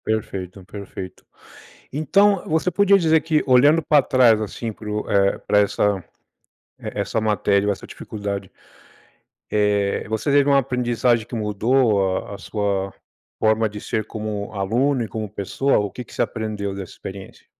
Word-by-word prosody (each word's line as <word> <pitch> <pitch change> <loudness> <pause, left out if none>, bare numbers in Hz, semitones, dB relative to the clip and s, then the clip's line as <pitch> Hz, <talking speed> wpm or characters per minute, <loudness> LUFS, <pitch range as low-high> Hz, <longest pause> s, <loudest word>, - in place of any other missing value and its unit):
Perfeito, 95 -4 -3
perfeito. 95 -2 -9 0.7
Então, 195 +8 +3
você 160 +3 +1
podia 200 +1 +4
dizer 160 -3 +3
que, 155 -1 +1
olhando 145 +6 +5
para 150 -2 +4
trás, 120 -5 +4
assim, 110 +2 -4
para 105 0 -11
o 105 0 -3
eh, 100 -1 +2
para 105 - +2
essa 100 -2 +1 0.8
e - - -8
essa - - -1
matéria 105 -2 +1
ou - - +3
essa - - -11
dificuldade, 100 -2 -6 1.0
eh, 105 -1 +1
você 110 +5 -1
teve 140 0 +4
uma 140 -1 +5
aprendizagem 120 -3 +1
que 120 - -8
mudou 105 -2 +1
a 100 - -7
a - - -18
sua 100 -2 -2 0.5
forma 110 0 +2
de 105 0 -8
ser 110 -1 -3
como 105 -1 -5
aluno 120 +7 +1
e - - -7
como 110 0 -4
pessoa, 105 +7 0
o 105 -1 -1
que 125 - -8
que - - -18
você - - +1
aprendeu 105 -3 -3
dessa 95 -2 -7
experiência? 95 0 -10
110 Hz, 160 wpm, -22 LUFS, 100-130 Hz, 1.0 s, olhando